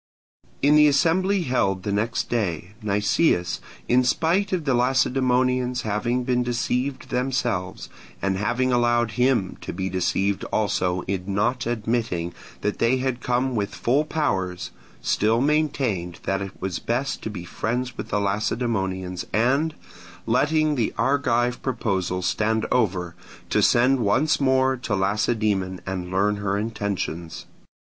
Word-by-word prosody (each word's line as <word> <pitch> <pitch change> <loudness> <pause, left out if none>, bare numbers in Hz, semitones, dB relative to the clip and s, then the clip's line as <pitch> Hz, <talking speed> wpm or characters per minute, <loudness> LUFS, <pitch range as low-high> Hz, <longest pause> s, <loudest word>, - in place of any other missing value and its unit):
In 145 +2 +5
the 150 0 +7
assembly 180 +6 +2
held 100 - 0
the 105 - -2
next 110 +3 -1
day, 95 -5 -2
Nicias, 105 - +1 0.3
in 125 +1 +4
spite 170 +9 +1
of 175 -5 -1
the 135 - +2
Lacedaemonians 125 0 +2
having 120 +4 -1
been 125 -1 +1
deceived 125 +2 -2
themselves, 125 -7 -1 0.3
and 100 -1 0
having 120 +6 0
allowed 120 -1 +2
him 125 -6 +1
to - - -5
be 95 0 -3
deceived 95 +2 0
also 90 -4 0
in 95 +1 -3
not 120 +4 0
admitting 110 -7 -1 0.3
that 105 - -2
they 115 +3 +3
had 130 -1 -2
come 125 +1 0
with 100 -2 -2
full 135 +6 +2
powers, 95 - -2 0.3
still 110 +2 +2
maintained 130 - 0
that 95 0 -1
it 100 0 -7
was 95 -2 -3
best 130 +3 -2
to - - -4
be 90 -5 -7
friends 125 +6 -3
with - - -6
the 105 - +1
Lacedaemonians, 100 -3 -1
and, 135 +9 +2 0.5
letting 155 0 +2
the 120 -6 0
Argive 125 0 +1
proposals 95 -8 -1
stand 110 +1 +1
over, 95 -8 +1 0.4
to - - +3
send 130 +3 +4
once 125 +8 +2
more 130 -1 +3
to 120 -4 -2
Lacedaemon 100 -1 0
and 90 -2 -4
learn 100 +3 +1
her 100 -1 -1
intentions. 100 -6 -3
115 Hz, 135 wpm, -24 LUFS, 100-130 Hz, 0.5 s, the